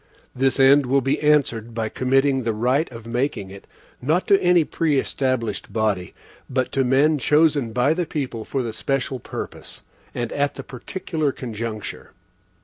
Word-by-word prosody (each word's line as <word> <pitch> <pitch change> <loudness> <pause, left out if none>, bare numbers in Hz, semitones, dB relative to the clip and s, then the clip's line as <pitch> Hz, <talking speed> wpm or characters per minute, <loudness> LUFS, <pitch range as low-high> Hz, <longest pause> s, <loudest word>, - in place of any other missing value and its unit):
This 135 +1 +1
end 135 0 +6
will 135 +2 +3
be 135 +2 0
answered 120 -7 +2
by 110 -1 -1
committing 135 +3 +2
the 115 -2 -1
right 130 +7 +1
of 115 -2 -10
making 120 -5 -2
it, 100 0 -12 0.3
not 160 +8 +1
to 195 - +5
any 175 -2 +4
preestablished 130 -8 -1
body, 105 -5 -1 0.3
but 130 -1 -1
to 135 - +1
men 140 +4 +3
chosen 150 -4 +3
by 125 +6 +2
the 175 0 -2
people 130 -8 -4
for 130 +3 -2
the 115 -2 -4
special 135 +1 -2
purpose, - - -8 0.3
and 120 -2 -3
at 145 0 0
the - - -7
particular 155 +3 -3
conjuncture. 115 -6 -6
130 Hz, 155 wpm, -22 LUFS, 115-145 Hz, 0.3 s, end